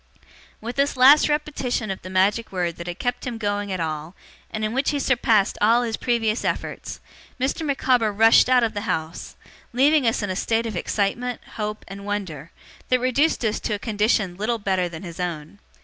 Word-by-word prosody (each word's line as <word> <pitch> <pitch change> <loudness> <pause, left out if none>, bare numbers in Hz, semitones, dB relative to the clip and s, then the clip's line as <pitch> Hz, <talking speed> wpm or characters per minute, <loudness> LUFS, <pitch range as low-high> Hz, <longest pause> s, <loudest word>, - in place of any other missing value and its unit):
With 235 +3 -6
this 280 -1 +1
last 275 +5 +7
repetition 270 -7 -1
of 190 - -6
the 185 - -9
magic 195 +5 +1
word 175 -3 -2
that 170 - -8
had 175 0 -5
kept 245 +2 -3
him 240 -2 -4
going 205 -2 -2
at 185 - -2
all, 160 +1 -4 0.3
and 215 0 -3
in 215 - -3
which 265 +2 +1
he 290 - 0
surpassed 230 -7 +2
all 230 +3 +4
his 225 -2 -2
previous 230 -2 0
efforts, - - -4 0.4
Mr. 265 +5 -1
Micawber 255 -6 +1
rushed 225 +4 +5
out 250 -1 +5
of 225 -1 0
the 205 - -3
house; 160 +1 -4 0.4
leaving 275 +1 +4
us 225 -1 0
in 205 - -2
a - - -3
state 225 +4 0
of 220 -3 -4
excitement, 225 +7 -1
hope, 210 -1 -4
and 195 +1 -9
wonder, 185 -7 -4 0.4
that 255 - +3
reduced 255 +2 +1
us 215 0 0
to 210 - -2
a - - -3
condition 210 -3 0
little 225 +4 -1
better 190 -4 -1
than 165 +1 -9
his 170 -2 -9
own. 170 +1 -5
215 Hz, 195 wpm, -23 LUFS, 190-245 Hz, 0.4 s, last